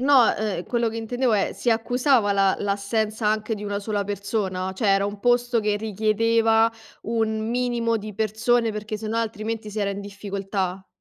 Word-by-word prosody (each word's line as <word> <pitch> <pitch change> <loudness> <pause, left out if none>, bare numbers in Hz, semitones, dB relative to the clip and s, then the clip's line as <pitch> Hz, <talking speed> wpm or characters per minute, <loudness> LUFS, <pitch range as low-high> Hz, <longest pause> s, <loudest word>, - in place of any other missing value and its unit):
no, 265 -2 +6
uhm, 205 -4 -2
quello 235 -1 0
che 230 - -5
intendevo 245 +2 0
è, 205 -2 +1
si 240 - 0
accusava 240 -1 +2
la 195 -1 +3
l'assenza 210 +2 -1
anche 215 +1 +1
di 210 0 -7
1 200 0 -2
sola 205 -1 -2
persona? 195 -2 -2
Cioè 215 +3 -1
era 195 0 +3
un 205 0 -5
posto, 245 +2 +2
che 210 -1 +1
richiedeva 225 +2 +2 0.3
un 220 -1 -1
minimo 240 -1 0
di 210 -1 -7
persone, 225 +2 +1
perché 210 0 -5
sennò 220 +1 -3
altrimenti 225 -1 -3
si 215 - -5
era 200 - +1
in 200 - -4
difficoltà? 195 -2 -4
215 Hz, 175 wpm, -24 LUFS, 200-230 Hz, 0.3 s, no